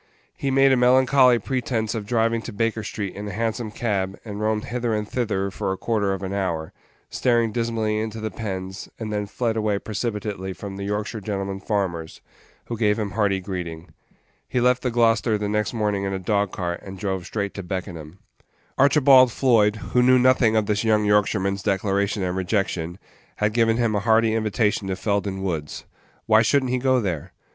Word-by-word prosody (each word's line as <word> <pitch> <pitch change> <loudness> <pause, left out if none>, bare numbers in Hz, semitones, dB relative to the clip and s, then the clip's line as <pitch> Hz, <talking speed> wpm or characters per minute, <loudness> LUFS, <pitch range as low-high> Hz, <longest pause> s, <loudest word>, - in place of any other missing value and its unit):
He 140 - -2
made 135 0 +4
a - - +5
melancholy 125 0 +5
pretence 115 -2 -2
of 110 -3 -5
driving 115 0 +1
to 120 - -7
Baker 115 +1 -1
street 100 -2 -5
in 105 +1 -6
a - - -4
Hansom 115 +2 -2
cab, 100 -4 -2
and 105 -1 -6
roamed 110 0 0
hither 120 -2 -1
and 105 0 -3
thither 105 -5 -1
for 95 - -3
a 95 - -3
quarter 105 -3 0
of 95 0 -3
an 95 +1 -3
hour, 85 -5 -2 0.4
staring 120 -3 +2
dismally 110 -2 -1
into 110 0 -4
the 110 -1 -4
pens, 95 -3 -5
and 110 -2 -5
then 105 -1 -2
fled 115 +2 -1
away 105 -2 0
precipitately 105 -3 -4
from 100 +1 -8
the 100 0 -5
Yorkshire 105 +2 -3
gentlemen 100 -1 -3
farmers, 95 -6 -3 0.5
who 115 -2 -5
gave 105 -2 +2
him 105 -3 -2
hearty 100 -3 +1
greeting. 90 -3 -6 0.6
He 125 - 0
left 125 +1 +3
the 125 - 0
Gloucester 115 -1 +2
the 105 0 -2
next 105 -1 0
morning 105 -4 -1
in 95 0 -2
a - - -1
dog 100 +1 0
cart, 85 -1 -3
and 95 -1 -9
drove 95 -3 -3
straight 100 -2 -3
to 100 - -5
Beckenham. 90 -3 -6 0.6
Archibald 135 -2 +6
Floyd, 110 -5 +3 0.2
who 125 - +5
knew 130 +1 +5
nothing 125 -3 +4
of 110 -1 +2
this 105 +1 0
young 105 -1 +2
Yorkshireman's 100 -1 +1
declaration 100 0 0
and 90 0 -1
rejection, 90 -3 -1 0.4
had 105 0 0
given 115 -1 +3
him 115 -3 +1
a 105 - +1
hearty 110 +1 +3
invitation 110 -2 0
to 95 - -1
Felden 100 -1 -1
Page 95 - -6
39 - - -5
Woods. 80 -5 -4 0.4
Why 110 0 +5
should 140 +4 +3
n't 125 - -2
he 125 - +1
go 130 0 +3
there? 90 -5 -3
105 Hz, 195 wpm, -23 LUFS, 95-115 Hz, 0.6 s, Archibald